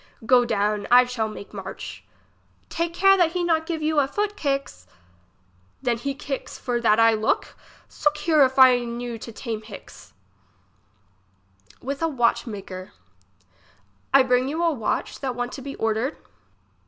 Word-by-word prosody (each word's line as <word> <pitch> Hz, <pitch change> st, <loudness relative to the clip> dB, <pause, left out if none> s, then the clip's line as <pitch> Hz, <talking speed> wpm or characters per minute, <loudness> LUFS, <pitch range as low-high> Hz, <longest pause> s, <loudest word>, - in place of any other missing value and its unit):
Go 245 Hz, 0 st, +5 dB
down, 210 Hz, -2 st, 0 dB
I 250 Hz, +1 st, +7 dB
shall 245 Hz, -3 st, -2 dB
make 210 Hz, -1 st, -10 dB
march. -, -, -8 dB, 0.7 s
Take 335 Hz, 0 st, -2 dB
care 390 Hz, +3 st, +5 dB
that 340 Hz, -3 st, +2 dB
he 360 Hz, -1 st, -1 dB
not 320 Hz, -2 st, +1 dB
give 320 Hz, -2 st, -3 dB
you 310 Hz, -1 st, +2 dB
a 275 Hz, -, +2 dB
foot 415 Hz, +7 st, -2 dB
kick's. 275 Hz, -, -3 dB, 1.0 s
Then 240 Hz, -3 st, 0 dB
he 275 Hz, +2 st, -3 dB
kicks 275 Hz, -1 st, -6 dB
for 240 Hz, -1 st, -2 dB
that 215 Hz, -1 st, +3 dB
I 225 Hz, 0 st, +6 dB
look? 215 Hz, 0 st, -1 dB, 0.3 s
Sook 300 Hz, 0 st, 0 dB
here 300 Hz, -1 st, +4 dB
if 260 Hz, 0 st, +1 dB
I 255 Hz, -2 st, +7 dB
knew 240 Hz, -1 st, -5 dB
to 230 Hz, -, -8 dB
tame 220 Hz, -1 st, -5 dB
hix. 215 Hz, -2 st, -13 dB, 1.7 s
IVith 275 Hz, +3 st, -4 dB
a 330 Hz, -, +2 dB
watch 240 Hz, -4 st, +1 dB
maker. 190 Hz, -3 st, -8 dB, 1.2 s
I 275 Hz, -1 st, +6 dB
bring 250 Hz, 0 st, +2 dB
you 320 Hz, +5 st, -2 dB
a 335 Hz, -, +3 dB
watch 235 Hz, -8 st, -3 dB
that 260 Hz, -3 st, -3 dB
want 245 Hz, 0 st, -3 dB
to 270 Hz, -, -8 dB
be 275 Hz, +1 st, -7 dB
ordered. 225 Hz, +6 st, -1 dB
255 Hz, 160 wpm, -24 LUFS, 230-300 Hz, 1.7 s, I